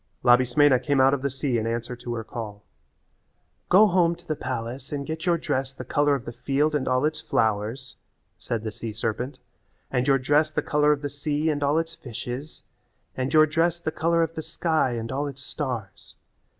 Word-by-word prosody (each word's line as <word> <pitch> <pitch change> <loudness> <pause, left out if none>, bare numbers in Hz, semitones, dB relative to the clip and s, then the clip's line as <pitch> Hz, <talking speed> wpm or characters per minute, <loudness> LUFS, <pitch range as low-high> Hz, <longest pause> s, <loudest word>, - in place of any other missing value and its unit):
Labismena 130 +2 +5
came 140 0 +1
out 135 +1 +5
of 140 - 0
the 140 - 0
sea 130 -2 -1
in 110 - -2
answer 120 +1 -3
to 120 0 -5
her 115 - -4
call. 105 -3 -7 1.1
"Go 200 +4 +7
home 175 -3 +3
to 175 0 -19
the 155 - -1
palace 130 0 -5
and 140 -1 -3
get 160 +3 -5
your 170 -1 +4
dress 135 -4 -2
the - - -7
colour 145 -1 +2
of 125 - -6
the - - -5
field 145 +5 0
and 145 -3 0
all 130 +2 +2
its 155 0 -1
flowers," 110 +4 -1 0.4
said 115 -2 -4
the 110 - -3
sea 115 0 -6
serpent, 120 +5 -3 0.5
"and 125 0 0
your 135 -1 +5
dress 145 +4 +2
the - - -1
colour 150 0 +3
of 145 -1 0
the - - 0
sea 150 +2 -1
and 145 -1 -2
all 145 +2 +2
its 165 0 -1
fishes, 125 +2 -7 0.5
and 130 +1 -2
your 155 0 +7
dress 165 +2 +1
the 155 - -3
colour 165 +1 +2
of 165 0 -3
the 160 - -4
sky 160 -4 0
and 115 0 -4
all 140 +2 -1
its 140 -1 -8
stars. 125 -11 -5
140 Hz, 205 wpm, -25 LUFS, 120-155 Hz, 1.1 s, Go